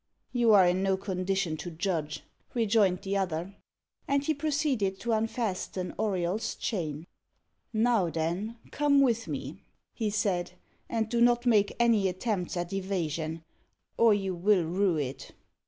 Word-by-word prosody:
"You 240 -2 +3
are 195 -3 +7
in 180 +1 +2
no 195 0 +2
condition 190 -3 -1
to 175 - -6
judge," 160 -3 -3 0.3
rejoined 210 -5 +2
the 195 0 -2
other. 180 0 -2 0.5
And 280 0 +1
he 315 - +1
proceeded 280 -10 0
to 235 - -1
unfasten 215 -5 -2
Auriol's 200 +1 -1
chain. 160 - -3 0.7
"Now 220 -5 +2
then, 175 +8 -2
come 290 -1 +3
with 235 -4 +2
me," - - -5 0.3
he 220 -3 -1
said, 200 -4 -1 0.4
"and 225 -2 0
do 235 +1 0
not 240 0 +4
make 210 -4 +3
any 230 -4 +4
attempt 185 -1 -2
at 175 +1 -3
evasion, 165 -4 -2 0.5
or 230 -1 +5
you 195 -2 -2
will 185 +1 +3
rue 180 +1 +1
it." 135 -2 -5
195 Hz, 140 wpm, -29 LUFS, 175-230 Hz, 0.7 s, are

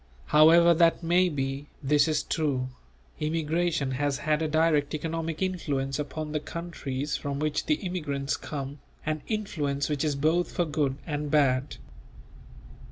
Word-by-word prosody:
However 170 +3 +7
that 170 +1 +3
may 180 +2 +3
be, 135 -1 -3 0.2
this 145 +2 +4
is 155 -1 +1
true: 135 -5 -1 0.5
immigration 160 -1 0
has 140 +1 0
had 155 +1 0
a 160 - +1
direct 155 -1 +2
economic 165 +2 -3
influence 145 -7 -2
upon 150 +1 -4
the 150 - 0
countries 150 -4 -4
from 140 -2 -3
which 150 +1 -1
the 310 - +4
immigrants 150 - -2
come, 140 -1 -6 0.3
an 155 -1 -1
influence 150 -10 -2
which 150 -1 -1
is 150 -2 0
both 160 +5 +1
for 175 - 0
good 145 -3 0
and 150 -2 -3
bad. 135 -2 +2
150 Hz, 145 wpm, -27 LUFS, 140-165 Hz, 0.5 s, However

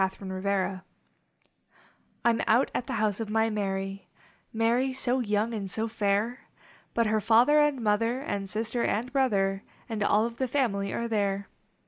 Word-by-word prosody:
ELOPEMENT 190 0 -1 1.4
I - - +6
m 230 - 0
out 240 +5 +3
at - - -2
the - - -3
home 215 -1 +1
of 225 -2 -4
my 220 +1 +2
Mary, 195 -1 -3 0.4
Mary 235 +4 +1
so 255 0 0
young 215 0 0
and 200 -3 -4
so 220 +4 -1
fair, 220 +2 -1 0.5
But 230 - +3
her 215 0 +1
father 240 +8 +5
and 295 -4 +2
mother 230 +4 +1
And 200 -7 -4
sister 225 +3 -2
and 240 +5 -1
brother 195 -8 +1 0.3
And 220 -3 -4
all 210 +2 +3
of 235 0 -5
the 260 - 0
family 215 -7 0
are 235 - -2
there. 200 -3 -1
220 Hz, 160 wpm, -28 LUFS, 200-235 Hz, 1.4 s, I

